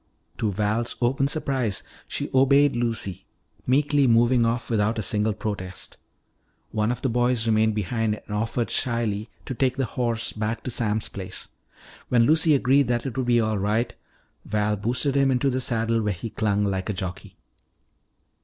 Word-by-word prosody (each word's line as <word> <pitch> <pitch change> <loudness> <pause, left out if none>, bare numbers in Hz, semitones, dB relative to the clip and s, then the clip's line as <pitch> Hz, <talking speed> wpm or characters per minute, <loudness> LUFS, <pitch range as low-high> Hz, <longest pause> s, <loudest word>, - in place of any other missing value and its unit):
To 110 -3 +1
Val's 110 +4 -1
open 135 +3 +2
surprise, 135 - -1 0.2
she - - -4
obeyed 140 +1 +5
Lucy, 115 -6 -2 0.4
meekly 145 +1 +3
moving 120 +1 +4
off 120 +1 -1
without 110 0 +1
a 110 - -1
single 105 +2 +1
protest. 95 -3 -5 0.7
One 110 +1 +1
of 125 - -5
the - - +2
boys 120 -1 +1
remained 110 -1 +2
behind 110 +1 -1
and 105 - -5
offered 115 +2 -1
shyly 115 -3 -1 0.2
to - - -4
take 130 +1 0
the 135 - +1
horse 115 -1 -2
back 110 +1 -3
to 125 - -4
Sam's 110 -2 -1
place. 95 -2 -7 0.6
When 120 -2 +4
Lucy 155 +3 +4
agreed 135 0 +3
that 120 0 0
it 135 - -4
would 130 -2 -1
be 120 -1 +4
all 110 -2 0
right, 110 +4 0 0.5
Val 105 0 0
boosted 125 +7 0
him 135 0 +3
into 135 +1 +2
the 130 +1 -1
saddle 115 -1 +1
where 105 -1 0
he 105 +5 -6
clung 105 -2 0
like 95 0 -2
a - - 0
jockey. 90 -2 -6
115 Hz, 170 wpm, -25 LUFS, 105-125 Hz, 0.7 s, obeyed